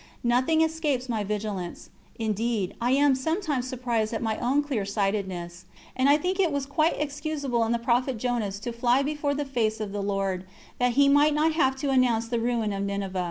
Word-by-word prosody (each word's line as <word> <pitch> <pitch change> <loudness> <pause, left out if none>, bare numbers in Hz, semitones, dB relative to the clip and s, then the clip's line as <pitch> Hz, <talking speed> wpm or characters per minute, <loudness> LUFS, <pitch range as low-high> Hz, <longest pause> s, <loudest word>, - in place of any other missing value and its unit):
Nothing 255 +7 +3
escapes 310 -5 0
my 225 -4 -1
vigilance; 205 -4 -4 0.3
indeed, 220 -2 -1
I 240 - +1
am 285 0 +4
sometimes 290 -1 -1
surprised 240 -4 -1
at - - -3
my 220 -1 -1
own 270 +4 +2
clear 265 -8 -2
sightedness, 190 -3 -2 0.3
and 260 +2 +3
I 290 - +6
think 365 +5 -2
it 355 -5 +3
was 280 -1 -1
quite 310 +4 +1
excusable 290 -4 -1
in 225 - -1
the 235 - +2
prophet 245 +2 0
Jonas 225 -4 -2
to 240 +2 -4
fly 245 +3 +2
before 290 0 -1
the 290 0 -2
face 225 -5 -1
of 210 -2 -4
the 205 0 -3
Lord, 195 -2 -1 0.4
that 245 -1 +2
he 280 +3 +5
might 290 +2 +4
not 310 +2 +3
have 265 -5 +2
to 275 +1 -2
announce 240 -3 +2
the 235 -1 0
ruin 230 -3 0
of 195 - -3
Ninive. 200 -1 -3
245 Hz, 200 wpm, -26 LUFS, 215-285 Hz, 0.4 s, I